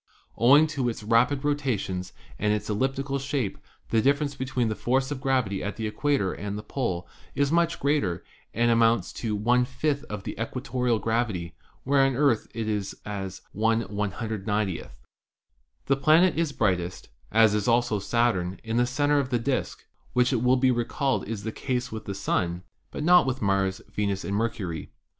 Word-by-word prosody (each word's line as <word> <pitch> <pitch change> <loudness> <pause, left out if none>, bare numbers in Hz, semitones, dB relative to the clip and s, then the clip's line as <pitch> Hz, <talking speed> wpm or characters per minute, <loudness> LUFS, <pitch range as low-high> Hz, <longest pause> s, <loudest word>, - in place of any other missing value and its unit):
Owing 140 +6 +6
to 130 -4 0
its 115 - -6
rapid 120 +6 +2
rotations 115 -11 -1 0.3
and 105 - +1
its 105 0 -1
elliptical 135 +5 -1
shape 135 -6 -2 0.3
the 115 - +3
difference 140 +3 +2
between 130 -3 -1
the 110 - -1
force 130 +4 0
of 135 -2 -4
gravity 130 -8 0
at 105 - -3
the 110 - -4
equator 110 -2 0
and 105 0 -5
the 105 - -6
pole 95 -10 -3 0.3
is 140 0 +1
much 170 0 +2
greater 140 - 0 0.3
and 120 +1 +2
amounts 115 0 +3
to 110 -3 -2
}i 125 0 +4 0.4
of 105 -2 -5
the - - -5
equatorial 125 0 -1
gravity, 110 -7 -1 0.3
where 140 0 +3
on 135 0 +2
the - - -4
Earth 140 -7 +3
it 115 -1 -2
is 105 -2 -3
as 95 -2 -5
1 115 +2 +1
/iw>. 105 -2 -2 1.0
The 135 - +2
planet 155 +5 +5
is 165 -2 0
brightest, 90 - -1 0.2
as 110 -1 +5
is 105 -1 0
also 120 -3 +2
Saturn, 100 -4 0
in 115 0 -2
the 120 0 +3
center 145 +3 +2
of 135 -2 -1
the 125 - +1
disk, 130 +3 -2 0.3
which 125 +2 +3
it 120 - +1
will 125 +1 +4
be 130 0 +3
recalled 125 +2 -1
is 110 -2 -4
the 110 - -3
case 125 +1 -3
with 110 0 -6
the 100 - -4
Sun, 90 -2 -1 0.3
but - - -5
not 175 -2 +6
with 130 0 -1
Mars, 95 -1 +1
Venus 100 -2 -1
and 100 - -2
Mercury. 100 -8 -2
115 Hz, 175 wpm, -26 LUFS, 105-135 Hz, 1.0 s, Owing